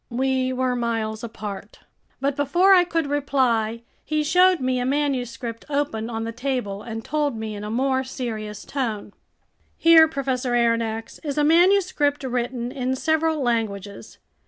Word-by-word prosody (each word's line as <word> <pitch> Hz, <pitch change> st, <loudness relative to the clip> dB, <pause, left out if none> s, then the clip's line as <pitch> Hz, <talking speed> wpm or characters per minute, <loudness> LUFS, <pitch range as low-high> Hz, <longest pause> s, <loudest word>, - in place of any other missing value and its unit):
We 260 Hz, +1 st, 0 dB
were 255 Hz, -1 st, 0 dB
miles 225 Hz, -2 st, -2 dB
apart. 210 Hz, -3 st, -7 dB, 0.4 s
But 275 Hz, +1 st, 0 dB
before 345 Hz, +8 st, +4 dB
I 360 Hz, -2 st, +7 dB
could 330 Hz, -2 st, -1 dB
reply, 255 Hz, -6 st, 0 dB, 0.2 s
he 305 Hz, 0 st, -1 dB
showed 360 Hz, +4 st, +4 dB
me 255 Hz, -1 st, 0 dB
a -, -, -1 dB
manuscript 250 Hz, -4 st, -2 dB
open 280 Hz, -6 st, -1 dB
on 225 Hz, -1 st, -3 dB
the 230 Hz, -, -4 dB
table 240 Hz, -5 st, -3 dB
and 225 Hz, 0 st, -7 dB
told 295 Hz, -5 st, -1 dB
me 220 Hz, -1 st, -4 dB
in 205 Hz, 0 st, -7 dB
a 210 Hz, -, -5 dB
more 260 Hz, +3 st, +1 dB
serious 220 Hz, -5 st, -6 dB
tone: 220 Hz, -7 st, -3 dB, 0.6 s
"Here, 330 Hz, -1 st, +7 dB
Professor 265 Hz, -4 st, -2 dB
Aronnax, 230 Hz, -1 st, 0 dB
is 290 Hz, -2 st, -4 dB
a 295 Hz, -, +3 dB
manuscript 330 Hz, -3 st, +3 dB
written 245 Hz, -1 st, -2 dB
in 260 Hz, -1 st, -2 dB
several 315 Hz, +1 st, 0 dB
languages. 215 Hz, -4 st, -3 dB
255 Hz, 150 wpm, -23 LUFS, 225-290 Hz, 0.6 s, I